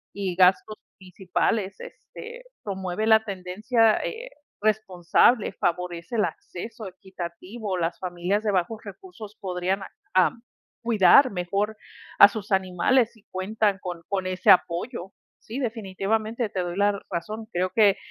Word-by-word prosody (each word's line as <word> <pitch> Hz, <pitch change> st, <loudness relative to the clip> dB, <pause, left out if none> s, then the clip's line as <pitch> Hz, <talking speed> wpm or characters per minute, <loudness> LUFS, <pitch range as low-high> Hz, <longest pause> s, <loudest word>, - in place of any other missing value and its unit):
y 195 Hz, -3 st, -3 dB
gastos 190 Hz, +3 st, +3 dB, 0.2 s
principales, 190 Hz, +2 st, -2 dB
este, 480 Hz, +2 st, -10 dB, 0.2 s
promueve 190 Hz, +1 st, -3 dB
la 220 Hz, 0 st, +5 dB
tendencia 215 Hz, +4 st, +1 dB
eh, 485 Hz, +2 st, -5 dB, 0.3 s
responsable, 215 Hz, +1 st, +2 dB
favorece 175 Hz, +2 st, -2 dB
el 215 Hz, -, +3 dB
acceso 195 Hz, +5 st, -6 dB
equitativo, 190 Hz, +2 st, -6 dB
las 170 Hz, 0 st, -2 dB
familias 185 Hz, +3 st, -2 dB
de 210 Hz, -, +1 dB
bajos 190 Hz, +4 st, 0 dB
recursos 215 Hz, -, -11 dB
podrían 185 Hz, +1 st, -2 dB
a -, -, -7 dB, 0.3 s
am, 185 Hz, +4 st, +3 dB, 0.4 s
cuidar 235 Hz, +3 st, +5 dB
mejor 200 Hz, +4 st, -2 dB, 0.4 s
a 205 Hz, -, +10 dB
sus 205 Hz, -1 st, -7 dB
animales 190 Hz, +6 st, +2 dB
si 220 Hz, -3 st, -23 dB
cuentan 205 Hz, +2 st, 0 dB
con 175 Hz, -3 st, -6 dB
con 195 Hz, -2 st, -2 dB
ese 185 Hz, 0 st, 0 dB
apoyo. 185 Hz, +3 st, +1 dB, 0.3 s
Sí, 240 Hz, +5 st, -7 dB
definitivamente 220 Hz, 0 st, -2 dB
te 190 Hz, -2 st, -3 dB
doy 175 Hz, 0 st, -4 dB
la 205 Hz, 0 st, +2 dB
razón. 215 Hz, +6 st, -4 dB
Creo 185 Hz, -1 st, -1 dB
que, 210 Hz, -4 st, +5 dB
195 Hz, 135 wpm, -25 LUFS, 180-220 Hz, 0.4 s, a